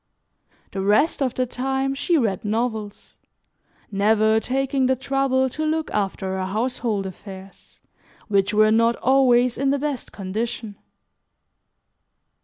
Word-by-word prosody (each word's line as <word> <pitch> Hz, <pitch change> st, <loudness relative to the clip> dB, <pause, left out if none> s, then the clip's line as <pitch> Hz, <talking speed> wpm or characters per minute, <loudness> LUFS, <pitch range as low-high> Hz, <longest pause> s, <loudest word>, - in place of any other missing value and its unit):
The 195 Hz, -, -3 dB
rest 210 Hz, +12 st, +2 dB
of 255 Hz, -2 st, 0 dB
the 255 Hz, -, +1 dB
time 265 Hz, +2 st, -2 dB
she 325 Hz, +5 st, +1 dB
read 215 Hz, -9 st, 0 dB
novels, 220 Hz, -1 st, -3 dB, 0.7 s
never 215 Hz, +2 st, +3 dB
taking 265 Hz, +2 st, 0 dB
the 260 Hz, -, +2 dB
trouble 265 Hz, 0 st, +1 dB
to 310 Hz, +5 st, -4 dB
look 315 Hz, 0 st, -1 dB
after 190 Hz, -2 st, -2 dB
her 185 Hz, -, -2 dB
household 220 Hz, -1 st, -1 dB
affairs, 190 Hz, +1 st, -11 dB, 0.5 s
which 200 Hz, -2 st, +2 dB
were 215 Hz, 0 st, +4 dB
not 230 Hz, +1 st, +3 dB
always 250 Hz, -2 st, +3 dB
in 275 Hz, 0 st, +1 dB
the 280 Hz, -, +2 dB
best 280 Hz, -3 st, -4 dB
condition. 215 Hz, +2 st, -4 dB
235 Hz, 125 wpm, -23 LUFS, 205-265 Hz, 0.7 s, were